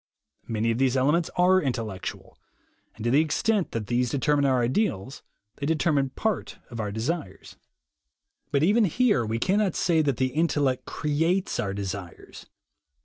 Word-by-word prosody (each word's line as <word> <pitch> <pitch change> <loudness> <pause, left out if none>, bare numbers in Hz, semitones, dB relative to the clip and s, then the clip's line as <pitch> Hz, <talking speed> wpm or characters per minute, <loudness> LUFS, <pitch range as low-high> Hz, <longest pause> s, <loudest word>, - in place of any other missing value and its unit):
Many 115 0 0
of 115 - -2
these 135 -1 +2
elements 150 +6 +2
are 185 +1 +5
intellectual, 115 -8 -4 0.6
and 110 - -9
to 120 - +1
the 140 +4 +5
extent 190 +5 0
that 115 -2 -3
these 120 +3 0
deter 140 +3 +1
mine 145 -1 +2
our 130 -3 +2
ideals, 130 - -1 0.4
they 140 - -3
determine 150 -4 +1
part 215 +9 -3
of 115 - -7
our 105 -2 -2
desires. 110 - -4 0.9
But 140 0 +1
even 210 +6 +4
here 210 - +2
we 110 +1 -2
cannot 195 - +1
say 165 -2 +2
that 140 -5 0
the 130 0 0
intellect 145 -5 +1
creates 165 +5 0
our 100 -1 -2
desires. 95 -3 -7
140 Hz, 155 wpm, -26 LUFS, 115-165 Hz, 0.9 s, are